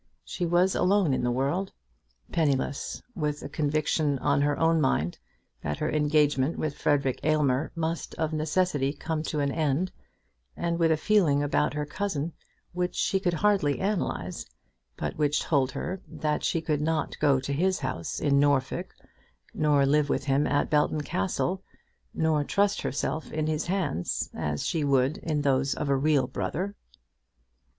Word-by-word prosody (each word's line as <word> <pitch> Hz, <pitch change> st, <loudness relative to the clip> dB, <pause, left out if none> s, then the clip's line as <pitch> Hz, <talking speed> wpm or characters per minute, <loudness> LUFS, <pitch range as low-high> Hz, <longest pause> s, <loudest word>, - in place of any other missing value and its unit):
She 175 Hz, -, -3 dB
was 175 Hz, +3 st, +3 dB
alone 185 Hz, -5 st, +3 dB
in 130 Hz, -, 0 dB
the 125 Hz, -, +1 dB
world, 140 Hz, +10 st, -1 dB, 0.6 s
penniless, 140 Hz, -3 st, -1 dB
with 150 Hz, -5 st, -2 dB
a -, -, -6 dB
conviction 150 Hz, -1 st, 0 dB
on 140 Hz, +1 st, +1 dB
her 145 Hz, 0 st, +1 dB
own 165 Hz, 0 st, +3 dB
mind 85 Hz, -, 0 dB, 0.4 s
that 75 Hz, -1 st, -3 dB
her -, -, -1 dB
engagement 150 Hz, -1 st, +2 dB
with 150 Hz, -2 st, -2 dB
Frederic 140 Hz, -3 st, +1 dB
Aylmer 150 Hz, -2 st, +1 dB
must 165 Hz, 0 st, -3 dB
of 160 Hz, 0 st, -1 dB
necessity 155 Hz, -3 st, +1 dB
come 160 Hz, +1 st, -3 dB
to 155 Hz, -1 st, -2 dB
an 140 Hz, -1 st, +1 dB
end, 155 Hz, +4 st, 0 dB, 0.7 s
and 170 Hz, 0 st, -1 dB
with 165 Hz, -1 st, +4 dB
a 160 Hz, -, +3 dB
feeling 155 Hz, -6 st, +3 dB
about 145 Hz, 0 st, +1 dB
her 150 Hz, 0 st, -1 dB
cousin 165 Hz, -1 st, -3 dB, 0.4 s
which 180 Hz, 0 st, -2 dB
she 195 Hz, -, +1 dB
could 175 Hz, -3 st, 0 dB
hardly 190 Hz, -6 st, +2 dB
analyse, 200 Hz, 0 st, -2 dB, 0.5 s
but -, -, -4 dB
which 150 Hz, -1 st, +2 dB
told 135 Hz, -4 st, +1 dB
her 190 Hz, +1 st, -4 dB
that 155 Hz, -1 st, -2 dB
she 165 Hz, -, +1 dB
could 150 Hz, -2 st, -1 dB
not 160 Hz, 0 st, -1 dB
go 140 Hz, -3 st, +4 dB
to 140 Hz, +2 st, -3 dB
his 185 Hz, +6 st, +1 dB
house 130 Hz, -, -3 dB
in 140 Hz, -1 st, +3 dB
Norfolk, 140 Hz, -2 st, +1 dB, 0.6 s
nor 145 Hz, -2 st, +3 dB
live 145 Hz, +1 st, +2 dB
with -, -, 0 dB
him 140 Hz, +1 st, +2 dB
at 145 Hz, +1 st, +1 dB
Belton 150 Hz, 0 st, +2 dB
Castle, 140 Hz, -, -1 dB, 0.5 s
nor 155 Hz, -2 st, +1 dB
trust 200 Hz, +6 st, +1 dB
herself 155 Hz, +2 st, -3 dB
in 155 Hz, 0 st, -1 dB
his 155 Hz, +1 st, -1 dB
hands 170 Hz, -, -1 dB
as 75 Hz, -1 st, -2 dB
she 160 Hz, -3 st, 0 dB
would 135 Hz, +1 st, +2 dB
into 150 Hz, -3 st, -2 dB
those 135 Hz, 0 st, +2 dB
of 150 Hz, -, -3 dB
a 140 Hz, -, +4 dB
real 140 Hz, -1 st, +2 dB
brother. 185 Hz, +9 st, -3 dB
150 Hz, 160 wpm, -27 LUFS, 140-165 Hz, 0.7 s, with